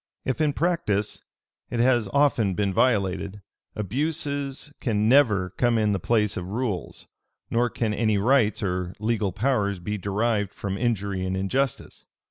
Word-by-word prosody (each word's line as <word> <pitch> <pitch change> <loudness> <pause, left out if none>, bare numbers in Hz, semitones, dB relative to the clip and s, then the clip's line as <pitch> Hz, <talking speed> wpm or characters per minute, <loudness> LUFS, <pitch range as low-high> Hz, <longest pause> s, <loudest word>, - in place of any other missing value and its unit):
If 130 +4 -1
in 150 -2 +2
practice 140 - -1 0.4
it 120 - -3
has 120 -3 +3
often 130 -9 +2
been 100 -1 0
violated, 100 -3 0 0.3
abuses 140 - -2
can 105 -3 +1
never 110 -8 +4
come 120 +2 +1
in 105 -1 +2
the 100 - 0
place 105 +1 +1
of 90 0 -5
rules; 105 -5 -3 0.4
nor 120 +1 +2
can 110 -2 -1
any 110 -1 +1
rights 110 0 +2
or 90 -1 -2
legal 110 -2 0
powers 105 -2 0
be 105 +4 -4
derived 105 +1 -1
from 100 -1 -3
injury 100 -4 -1
and 95 0 -2
injustice. 130 +8 -2
105 Hz, 145 wpm, -25 LUFS, 100-125 Hz, 0.4 s, never